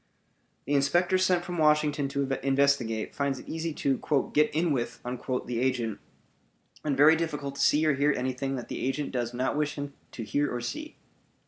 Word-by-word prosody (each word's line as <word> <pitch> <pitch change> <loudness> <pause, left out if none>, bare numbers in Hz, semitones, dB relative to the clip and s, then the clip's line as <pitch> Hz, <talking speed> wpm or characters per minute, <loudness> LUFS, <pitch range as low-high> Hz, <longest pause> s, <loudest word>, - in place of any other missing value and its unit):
The 145 - -1
inspector 175 +7 +3
sent 180 -2 +2
from 175 -1 -4
Washington 150 -2 +3
to 140 0 -1 0.2
investigate 135 -5 +1
finds 140 -1 -1
it - - -11
easy 165 +1 -3
to 135 +1 0
"get 150 0 +4
in 165 +2 0
with" 120 -3 -2
the 125 -1 -3
agent 125 -4 0 0.8
and 145 -3 -1
very 150 +3 +7
difficult 150 -4 -3
to 140 - -4
see 155 +2 +4
or 155 - +4
hear 140 +2 +2
anything 130 +1 -2
that 125 - -6
the - - -5
agent 135 +2 -1
does 120 -2 -2
not 125 +3 -1
wish 150 0 -1
him 145 -1 -5 0.2
to 115 - -5
hear 145 +7 0
or 125 - -2
see. 310 - -5
140 Hz, 185 wpm, -28 LUFS, 130-150 Hz, 0.8 s, very